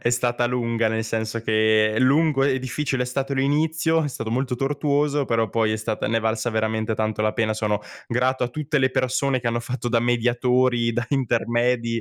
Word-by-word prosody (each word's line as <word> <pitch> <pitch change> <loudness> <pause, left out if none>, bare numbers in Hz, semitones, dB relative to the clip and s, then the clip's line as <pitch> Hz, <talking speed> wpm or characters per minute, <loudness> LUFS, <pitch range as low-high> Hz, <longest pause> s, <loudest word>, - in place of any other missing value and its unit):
è 120 - +1
stata 120 0 +1
lunga, 115 -2 0
nel 110 0 -2
senso 110 +1 -3
che: 110 -1 +2
lungo 140 +2 +3
e 135 -1 +2
difficile 130 +1 -2
è 125 - -3
stato 135 +2 -2
l'inizio, 160 +4 +1
è 150 - -1
stato 115 -4 -5
molto 125 +2 -1
tortuoso, 145 +1 0
però 115 -2 +1
poi 110 0 +1
è - - 0
stata 110 0 -3
ne 115 - +1
è - - +1
valsa 110 +2 -1
veramente 110 0 -1
tanto 110 0 -2
la 110 0 +1
pena. 110 -2 0
Sono 105 -1 -1 0.3
grato 125 +2 0
a - - -2
tutte 150 +3 -2
le 130 -1 +2
persone 130 +1 0
che 120 - -5
hanno 120 0 -1
fatto 120 0 -4
da 120 -1 +2
mediatori, 120 0 +1
da 120 +1 -1
intermedi, 120 -3 0
120 Hz, 200 wpm, -23 LUFS, 115-135 Hz, 0.3 s, lungo